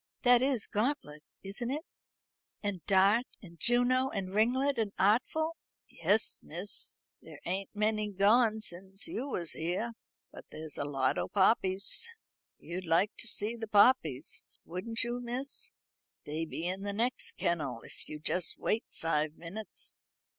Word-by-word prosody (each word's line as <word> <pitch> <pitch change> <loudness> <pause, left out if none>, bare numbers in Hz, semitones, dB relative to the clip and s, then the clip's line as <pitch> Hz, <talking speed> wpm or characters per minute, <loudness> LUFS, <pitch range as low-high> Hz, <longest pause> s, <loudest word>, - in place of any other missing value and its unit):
That 245 -1 +7
is 260 -4 +1
Gauntlet, 210 - -1 0.2
isn't 205 +5 -3
it? 300 +5 -3 0.8
And 195 -5 -2
Dart, 200 +5 +5 0.2
and 170 -3 -13
Juno, 245 +2 +3
and 190 -4 -4
Ringlet, 250 +5 +2
and 210 -3 0
Artful?" 290 - +2 0.3
"Yes, 200 +7 +1
miss. 180 +5 -4 0.2
There 155 -3 -12
ain't 190 +2 -1
many 215 0 +1
gone 215 +3 +4
since 190 0 -6
you 260 +5 -3
was 175 - -2
here. 180 +8 -2 0.4
But - - -11
there's 155 -1 -7
a 145 - 0
lot 135 -2 +1
o' - - -1
poppies. 195 - +2 0.5
You'd 180 +1 -6
like 175 +6 +4
to 240 - -2
see 215 +1 +2
the 225 -1 -5
poppies, 200 - +3
wouldn't 225 +7 -2
you, 240 +1 -2
miss? 250 +3 -3 0.5
They 155 +2 -2
be 160 +1 -5
in 185 +2 -2
the 200 0 -3
next 240 +5 0
kennel, 145 -9 -1
if - - -13
you'll 150 -1 -7
just 175 +2 0
wait 225 - 0
five 155 -1 -1
minutes." 195 +7 -5
205 Hz, 145 wpm, -32 LUFS, 170-235 Hz, 0.8 s, That